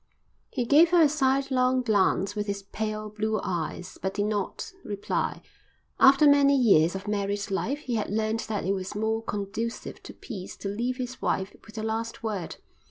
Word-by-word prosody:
He 250 Hz, -3 st, -2 dB
gave 305 Hz, +7 st, +6 dB
her 345 Hz, -1 st, +6 dB
a -, -, +7 dB
sidelong 265 Hz, -3 st, +2 dB
glance 200 Hz, -3 st, +2 dB
with 210 Hz, 0 st, -2 dB
his 200 Hz, 0 st, -3 dB
pale, 215 Hz, +1 st, -4 dB
blue 215 Hz, 0 st, -1 dB
eyes, 175 Hz, +1 st, -4 dB
but 190 Hz, 0 st, -2 dB
did 205 Hz, -, 0 dB
not 210 Hz, -2 st, -3 dB
reply. 205 Hz, -1 st, -2 dB, 0.6 s
After 275 Hz, +3 st, +7 dB
many 280 Hz, -1 st, +6 dB
years 185 Hz, -9 st, +4 dB
of 190 Hz, +2 st, -6 dB
married 200 Hz, -1 st, -2 dB
life 225 Hz, +8 st, -1 dB
he 255 Hz, -, -4 dB
had 215 Hz, -2 st, -1 dB
learned 220 Hz, +2 st, 0 dB
that 210 Hz, -4 st, -2 dB
it 195 Hz, -, +1 dB
was 190 Hz, 0 st, -4 dB
more 220 Hz, +1 st, 0 dB
conducive 215 Hz, +2 st, -4 dB
to -, -, -10 dB
peace 190 Hz, -4 st, -8 dB
to 200 Hz, -, -4 dB
leave 240 Hz, +5 st, -2 dB
his 255 Hz, -1 st, -5 dB
wife 190 Hz, +1 st, -1 dB
with 220 Hz, -, -15 dB
the 215 Hz, -, -4 dB
last 225 Hz, +1 st, -3 dB
word. 200 Hz, -7 st, -3 dB
215 Hz, 180 wpm, -27 LUFS, 200-250 Hz, 0.6 s, a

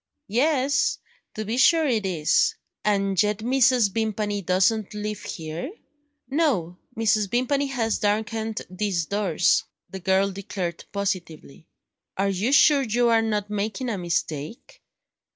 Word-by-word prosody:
"Yes, 280 Hz, +2 st, +2 dB, 0.4 s
to 215 Hz, -, -4 dB
be 225 Hz, +4 st, -2 dB
sure 320 Hz, +5 st, +5 dB
it 225 Hz, -8 st, 0 dB
is." 160 Hz, -5 st, +2 dB, 0.3 s
"And 195 Hz, -3 st, +2 dB
yet 210 Hz, -1 st, +1 dB
Mrs. 250 Hz, -1 st, +3 dB
Vimpany 210 Hz, -2 st, -1 dB
doesn't 195 Hz, +4 st, +1 dB
live 210 Hz, -1 st, -4 dB
here?" 165 Hz, -, -6 dB, 0.6 s
"No 245 Hz, -, 0 dB, 0.2 s
Mrs. 215 Hz, -2 st, +2 dB
Vimpany 275 Hz, +5 st, +1 dB
has 230 Hz, -5 st, -1 dB
darkened 220 Hz, +1 st, -1 dB
these 185 Hz, -2 st, -2 dB
doors," 180 Hz, -3 st, +2 dB, 0.3 s
the 190 Hz, -, -6 dB
girl 190 Hz, +2 st, +2 dB
declared 185 Hz, -3 st, -5 dB
positively. 175 Hz, -7 st, -4 dB, 0.5 s
"Are 195 Hz, +1 st, +1 dB
you 195 Hz, +6 st, 0 dB
sure 285 Hz, 0 st, +6 dB
you 240 Hz, -1 st, +1 dB
are 225 Hz, -1 st, +4 dB
not 210 Hz, -2 st, -2 dB
making 210 Hz, +4 st, -2 dB
a 215 Hz, -, -2 dB
mistake?" 165 Hz, -, -4 dB
210 Hz, 130 wpm, -24 LUFS, 190-235 Hz, 0.6 s, sure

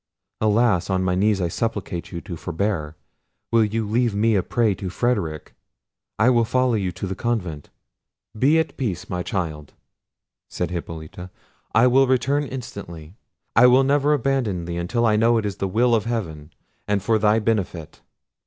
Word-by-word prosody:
Alas! 110 Hz, -4 st, +2 dB
on 95 Hz, -1 st, +1 dB
my 90 Hz, -1 st, +1 dB
knees 100 Hz, +2 st, +2 dB
I 90 Hz, -, 0 dB
supplicate 95 Hz, -2 st, -3 dB
you 85 Hz, -2 st, -5 dB
to 85 Hz, +1 st, -7 dB
forbear; 80 Hz, -2 st, -3 dB, 0.6 s
will 115 Hz, -1 st, +4 dB
you 110 Hz, +1 st, -1 dB
leave 115 Hz, 0 st, +1 dB
me 110 Hz, +2 st, +2 dB
a 100 Hz, -, +3 dB
prey 115 Hz, +1 st, +1 dB
to 95 Hz, 0 st, -5 dB
Frederic? 85 Hz, -8 st, -2 dB, 0.6 s
I 110 Hz, +4 st, +4 dB
will 120 Hz, -2 st, +3 dB
follow 130 Hz, +2 st, +1 dB
you 95 Hz, -5 st, -1 dB
to 100 Hz, -, -5 dB
the 95 Hz, -, -3 dB
convent." 90 Hz, -9 st, -3 dB, 0.7 s
"Be 135 Hz, +8 st, +3 dB
at 160 Hz, -, -1 dB
peace, 105 Hz, -, -3 dB
my 90 Hz, 0 st, -2 dB
child," 80 Hz, -6 st, -4 dB, 0.8 s
said 90 Hz, -1 st, -3 dB
Hippolita: 85 Hz, +1 st, -7 dB, 0.5 s
"I 115 Hz, +3 st, +6 dB
will 130 Hz, +2 st, +4 dB
return 135 Hz, +3 st, +1 dB
instantly. 95 Hz, -, -8 dB, 0.4 s
I 125 Hz, +2 st, +7 dB
will 130 Hz, +2 st, +5 dB
never 145 Hz, +2 st, +2 dB
abandon 120 Hz, -10 st, -1 dB
thee, 85 Hz, 0 st, -4 dB
until 115 Hz, +8 st, 0 dB
I 105 Hz, -2 st, +3 dB
know 115 Hz, +2 st, +4 dB
it 110 Hz, -, -1 dB
is 100 Hz, -1 st, -3 dB
the 95 Hz, -, -2 dB
will 120 Hz, +5 st, +2 dB
of 110 Hz, -2 st, +2 dB
heaven, 85 Hz, -10 st, -4 dB, 0.4 s
and 100 Hz, -2 st, 0 dB
for 110 Hz, +1 st, +2 dB
thy 105 Hz, +1 st, +3 dB
benefit." 100 Hz, -8 st, -2 dB
105 Hz, 170 wpm, -22 LUFS, 90-120 Hz, 0.8 s, I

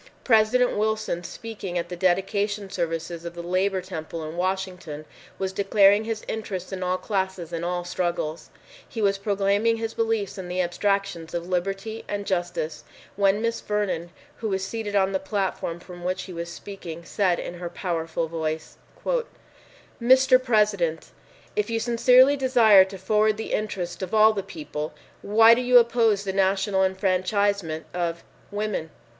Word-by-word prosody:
President 245 Hz, +1 st, +4 dB
Wilson, 215 Hz, -4 st, -1 dB
speaking 200 Hz, -4 st, -6 dB
at 170 Hz, 0 st, -3 dB
the 180 Hz, -, -4 dB
dedication 195 Hz, +3 st, 0 dB
services 165 Hz, -1 st, -3 dB
of 170 Hz, 0 st, -7 dB
the 170 Hz, -, -6 dB
Labor 185 Hz, +2 st, 0 dB
Temple 165 Hz, -3 st, -6 dB
in 155 Hz, -, -7 dB
Washington, 180 Hz, -4 st, -3 dB, 0.3 s
was 190 Hz, 0 st, -2 dB
declaring 200 Hz, +1 st, +4 dB
his 225 Hz, -1 st, -4 dB
interest 195 Hz, -4 st, -4 dB
in 190 Hz, -, -4 dB
all 185 Hz, 0 st, 0 dB
classes 190 Hz, -4 st, -3 dB
and 165 Hz, 0 st, -3 dB
all 175 Hz, 0 st, -1 dB
struggles. 175 Hz, -3 st, -2 dB, 0.4 s
He 230 Hz, -, -6 dB
was 200 Hz, -2 st, +2 dB
proclaiming 200 Hz, +3 st, +1 dB
his 225 Hz, 0 st, -3 dB
beliefs 225 Hz, -4 st, -1 dB
in 185 Hz, -, -6 dB
the 180 Hz, +1 st, -3 dB
abstractions 180 Hz, -2 st, -1 dB
of 170 Hz, 0 st, -3 dB
liberty 195 Hz, +5 st, -2 dB
and 205 Hz, 0 st, -3 dB
justice, 175 Hz, -4 st, -2 dB, 0.3 s
when 200 Hz, +2 st, +2 dB
Miss 230 Hz, 0 st, -1 dB
Vernon, 200 Hz, -5 st, -2 dB, 0.3 s
who 220 Hz, -, -3 dB
was 190 Hz, -1 st, -1 dB
seated 215 Hz, -1 st, -4 dB
on 195 Hz, -1 st, +3 dB
the 190 Hz, -, 0 dB
platform 190 Hz, -4 st, -2 dB
from 175 Hz, 0 st, -11 dB
which 185 Hz, +1 st, -2 dB
he 185 Hz, -, -9 dB
was 170 Hz, 0 st, -5 dB
speaking, 170 Hz, -4 st, -8 dB
said 185 Hz, -3 st, +1 dB
in 175 Hz, -, -6 dB
her 175 Hz, -1 st, -4 dB
powerful 165 Hz, -2 st, -2 dB
voice, 160 Hz, -1 st, -4 dB, 1.2 s
"Mr. 255 Hz, +1 st, +5 dB
President, 210 Hz, -9 st, +1 dB, 0.4 s
if 425 Hz, -, 0 dB
you 230 Hz, 0 st, 0 dB
sincerely 250 Hz, +4 st, +5 dB
desire 240 Hz, -7 st, +6 dB
to 190 Hz, 0 st, -9 dB
forward 210 Hz, +3 st, +2 dB
the 220 Hz, -, -4 dB
interests 195 Hz, -5 st, -3 dB
of 190 Hz, +4 st, -3 dB
all 215 Hz, 0 st, +6 dB
the 200 Hz, -, -2 dB
people, 150 Hz, -5 st, -6 dB, 0.3 s
why 225 Hz, +3 st, +6 dB
do 240 Hz, -, +1 dB
you 250 Hz, 0 st, +6 dB
oppose 230 Hz, -4 st, +3 dB
the 190 Hz, -1 st, -3 dB
national 195 Hz, 0 st, +2 dB
enfranchisement 190 Hz, -2 st, 0 dB
of, 170 Hz, -1 st, -2 dB, 0.3 s
women?" 205 Hz, -6 st, -3 dB
195 Hz, 160 wpm, -25 LUFS, 175-215 Hz, 1.2 s, desire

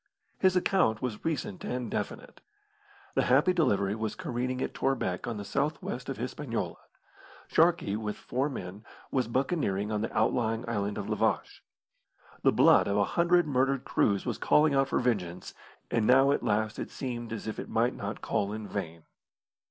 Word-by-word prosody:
His 185 Hz, -1 st, +4 dB
account 180 Hz, -, +2 dB
was 120 Hz, -4 st, -3 dB
recent 145 Hz, -, -3 dB
and 125 Hz, -3 st, -3 dB
definite. -, -, -5 dB, 0.7 s
The -, -, +2 dB
Happy 145 Hz, +9 st, +4 dB
Delivery 100 Hz, -, +2 dB
was 110 Hz, 0 st, -3 dB
careening 125 Hz, +1 st, -3 dB
at -, -, -3 dB
Torbec 120 Hz, -10 st, -1 dB
on 115 Hz, -2 st, -3 dB
the 100 Hz, -, -6 dB
south 145 Hz, +6 st, -1 dB
west 125 Hz, +2 st, -5 dB
of 135 Hz, -, -3 dB
Hispaniola. 125 Hz, 0 st, -4 dB, 0.7 s
Sharkey, 165 Hz, -, +3 dB
with 105 Hz, -1 st, -3 dB
four 135 Hz, +4 st, -1 dB
men, 100 Hz, -5 st, -7 dB, 0.3 s
was 130 Hz, -4 st, +1 dB
buccaneering 115 Hz, -, 0 dB
on 105 Hz, -1 st, 0 dB
the 110 Hz, -, -2 dB
outlying 115 Hz, -1 st, +1 dB
island 105 Hz, -3 st, -2 dB
of 100 Hz, -, -4 dB
La 105 Hz, -, 0 dB
Vache. -, -, 0 dB, 0.8 s
The -, -, +4 dB
blood -, -, +5 dB
of 100 Hz, -, +1 dB
a 100 Hz, -, +3 dB
hundred 175 Hz, 0 st, +4 dB
murdered 135 Hz, -2 st, +1 dB
crews 100 Hz, -2 st, +1 dB
was -, -, -3 dB
calling 150 Hz, -1 st, +4 dB
out 135 Hz, 0 st, +3 dB
for -, -, 0 dB
vengeance, 90 Hz, -8 st, -1 dB, 0.4 s
and 115 Hz, -2 st, +2 dB
now 135 Hz, +2 st, +6 dB
at -, -, +1 dB
last 105 Hz, +1 st, 0 dB
it -, -, -4 dB
seemed 120 Hz, -3 st, -5 dB
as 115 Hz, -, -5 dB
if 110 Hz, -, -4 dB
it -, -, -6 dB
might -, -, +1 dB
not -, -, -5 dB
call 100 Hz, 0 st, 0 dB
in 110 Hz, -1 st, -5 dB
vain. 85 Hz, -6 st, -5 dB
120 Hz, 175 wpm, -29 LUFS, 105-135 Hz, 0.8 s, now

